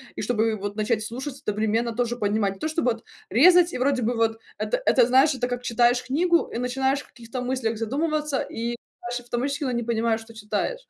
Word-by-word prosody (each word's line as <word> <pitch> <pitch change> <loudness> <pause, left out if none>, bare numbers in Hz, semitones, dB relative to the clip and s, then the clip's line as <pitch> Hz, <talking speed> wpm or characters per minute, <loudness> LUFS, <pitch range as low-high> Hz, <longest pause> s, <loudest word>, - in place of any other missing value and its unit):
и - - -4
чтобы 220 0 +1
вот 205 0 -5
начать 215 0 0
слушать, 260 +5 -6
одновременно 220 +3 0
тоже 240 +1 -1
поднимать? 205 -3 0
Не 195 - -16
то - - -1
чтоб 315 -1 -1
вот 235 -2 0 0.3
резать, 345 - +6
и - - -2
вроде 260 0 +1
бы 240 +2 0
вот 225 -1 +1 0.2
это - - -1
это, 245 -3 +5
знаешь, 270 +3 +5
это 245 -1 -1
как 245 0 -3
читаешь 245 +1 +3
книгу 335 +6 +2
и - - -2
начинаешь 265 +3 0
в - - -17
каких-то 240 0 -7
мыслях 250 -3 -1
задумываться, 295 +5 -1
и 235 +1 -3 0.2
дальше 245 +1 -4
автоматически 270 +5 -2
не 240 0 -1
понимаешь, 225 -1 0
что 225 +1 -13
читаешь 220 - -3
это. - - -56
240 Hz, 210 wpm, -25 LUFS, 225-270 Hz, 0.3 s, резать